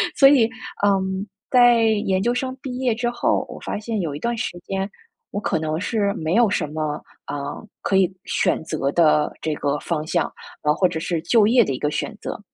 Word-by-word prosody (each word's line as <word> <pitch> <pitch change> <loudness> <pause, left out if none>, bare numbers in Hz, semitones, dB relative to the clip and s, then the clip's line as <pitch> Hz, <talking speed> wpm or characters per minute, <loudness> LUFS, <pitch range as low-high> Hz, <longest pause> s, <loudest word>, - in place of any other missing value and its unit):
所 275 -1 +8
以， 240 -6 +5 0.4
嗯， 190 0 +1 0.3
在 245 -2 +6 0.2
研 190 -1 +1
究 240 - +2
生 260 +1 -2
毕 250 -2 -5
业 250 -4 +1
之 240 +1 -1
后， 240 0 0
我 - - -8
发 - - -3
现 220 -1 -3
有 155 -5 -3
一 - - -6
段 235 +5 -1
时 225 -6 -3
间， 195 0 -2 0.4
我 205 - -3
可 160 - 0
能 155 +1 -2
是 205 -1 0
没 160 +1 -2
有 235 -3 +5
什 170 - 0
么， 155 0 -3 0.3
呃， 145 - -4 0.5
可 195 - 0
以 190 -1 +3
选 - - +1
择 150 -3 -1
的 150 -2 +3
这 155 - -1
个 145 0 -1
方 155 -3 -2
向， - - 0 0.3
嗯， 150 0 +3
或 185 - +3
者 160 - -4
是 165 0 -2
就 215 +4 +4
业 240 +1 +5
的 140 - -2
一 - - -4
个 150 - 0
选 215 - -3
择。 - - -5
195 Hz, 230 characters per minute, -22 LUFS, 155-235 Hz, 0.5 s, 所